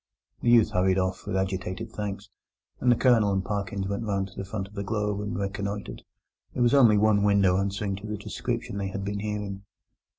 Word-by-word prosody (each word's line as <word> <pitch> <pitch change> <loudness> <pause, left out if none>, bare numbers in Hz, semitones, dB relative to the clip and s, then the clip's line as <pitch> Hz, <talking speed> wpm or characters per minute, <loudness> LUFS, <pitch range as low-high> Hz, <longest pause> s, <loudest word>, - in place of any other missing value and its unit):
The 120 - +1
youth 120 -2 +6
hurried 95 +1 +2
off 95 0 -1
with 95 - -1
agitated 95 -1 -3
thanks, 100 -1 -5 0.5
and 125 - +3
the - - +5
Colonel 115 -5 +4
and 95 -1 0
Parkins 100 -2 -2
went 100 +2 -2
round 100 -3 -1
to 95 - -18
the - - -4
front 95 0 -4
of 100 - -18
the 100 - -4
Globe 105 -1 -1
and 105 0 -3
reconnoitred. 100 +1 -4 0.5
There 125 - +2
was 120 - +4
only 120 -7 +6
one 105 0 +4
window 100 -3 +4
answering 100 0 -2
to 100 +2 -8
the 105 0 -3
description 100 0 -4
they 100 - -2
had 95 0 -4
been 100 0 -2
hearing. 105 -2 -4
100 Hz, 205 wpm, -27 LUFS, 95-105 Hz, 0.5 s, youth